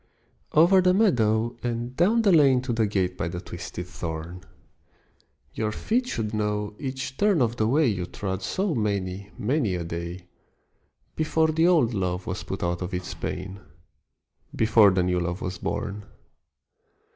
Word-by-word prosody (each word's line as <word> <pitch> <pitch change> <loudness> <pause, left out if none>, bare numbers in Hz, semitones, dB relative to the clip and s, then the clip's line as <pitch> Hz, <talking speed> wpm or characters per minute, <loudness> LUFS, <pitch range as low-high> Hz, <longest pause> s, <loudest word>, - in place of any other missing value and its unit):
OVER 175 +5 +6
the 180 0 +3
meadow 120 - +2
and 120 +1 -3
down 215 - +3
the 200 - +4
lane 140 -6 +5
To 125 -2 -2
the 115 -2 +1
gate 95 -3 0
by 80 - -2
the 85 +1 -4
twisted 90 0 -7
thorn: 85 +1 -6 1.1
Your 110 -1 -1
feet 240 - -1
should 110 - -3
know 105 -1 -1
each 130 -1 -5
turn 205 -4 +3
of 120 -2 +1
the 110 - +1
way 150 +6 +3
You 95 -7 -1
trod 95 -1 -4
so 190 -2 -1
many 100 -4 -2
many 115 -4 0
a 90 - -3
day, 85 +2 -6 0.9
Before 160 0 +1
the 160 +2 +3
old 155 -10 +3
love 90 -2 -2
was 90 - -4
put 95 - -5
out 85 0 -1
of 90 0 -3
its 90 0 -5
pain, 95 +2 -5 1.0
Before 110 -2 +5
the 95 -1 +2
new 90 0 +1
love 85 +1 -2
was 90 -1 -5
born. 100 +1 -4
105 Hz, 160 wpm, -25 LUFS, 90-140 Hz, 1.1 s, OVER